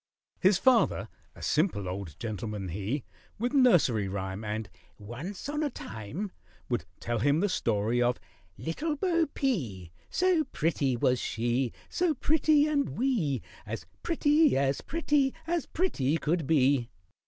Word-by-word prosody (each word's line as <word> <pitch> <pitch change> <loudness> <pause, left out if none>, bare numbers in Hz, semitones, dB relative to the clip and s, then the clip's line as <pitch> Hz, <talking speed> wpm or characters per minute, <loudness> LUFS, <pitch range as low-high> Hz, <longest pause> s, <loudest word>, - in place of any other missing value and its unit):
His 190 0 +5
father, 255 +3 +3 0.3
a - - -11
simple 150 - +1
old 90 -5 -5
gentleman, 105 -3 -4
he 105 - -2 0.3
With 245 +5 -1
nursery 170 - +4
rhyme 95 +1 -4
And 110 0 -3 0.3
"Once 140 - -7
on 295 +1 -2
a 300 - +1
time," 125 - -6 0.4
Would - - -1
tell 120 -1 -2
him 145 +6 +3
the 205 - +2
story 115 - +1
of 120 0 +2 0.4
"Little 295 - -2
Bo 335 0 +1
P," 125 - -2 0.2
"So 360 -4 +2
pretty 140 -5 0
was 125 +1 +2
she, 120 +3 0 0.2
So 345 -4 +1
pretty 305 +1 +3
and 290 -3 0
wee, 215 - +1 0.2
As - - -6 0.2
pretty, 305 - +3
as 135 0 +1
pretty, 295 -4 +1
as 340 0 -1
pretty 160 - 0
could 160 -1 -1
be." 135 -5 +3
150 Hz, 140 wpm, -29 LUFS, -, 0.4 s, His